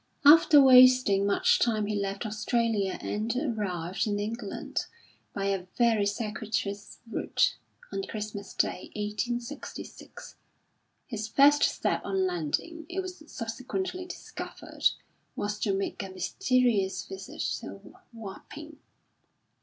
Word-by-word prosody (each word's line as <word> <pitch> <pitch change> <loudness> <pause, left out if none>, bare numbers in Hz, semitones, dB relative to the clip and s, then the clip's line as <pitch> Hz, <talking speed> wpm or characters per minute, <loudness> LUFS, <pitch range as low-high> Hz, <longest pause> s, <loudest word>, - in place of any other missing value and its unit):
After 305 +1 +8
wasting 255 -6 +7
much 200 - +3
time 220 -3 +1
he 210 0 -2
left 200 +2 -2
Australia 215 -2 0
and 220 +3 -2
arrived 205 - -2
in 205 -1 0
England, 210 0 -4 0.4
by 195 - -3
a 195 -2 -1
very 225 -4 +3
circuitous 210 -1 -3
route, 230 - +1 0.4
on - - -1
Christmas 210 -2 -6
Day, 180 - -1
1866. 235 +6 -5 0.7
His 215 -3 -4
first 285 +5 +5
step - - +1
on 190 -1 0
landing, 185 - -2
it 380 +2 -2
was 370 -3 -8
subsequently 265 +12 -4
discovered, 360 - -3 0.5
was 205 0 -3
to 205 - 0
make 195 0 -2
a 195 - -6
mysterious 200 +2 +1
visit 195 +12 -8 0.2
to - - -9 0.3
Wapping. 235 +8 -10
215 Hz, 115 wpm, -28 LUFS, 200-255 Hz, 0.7 s, After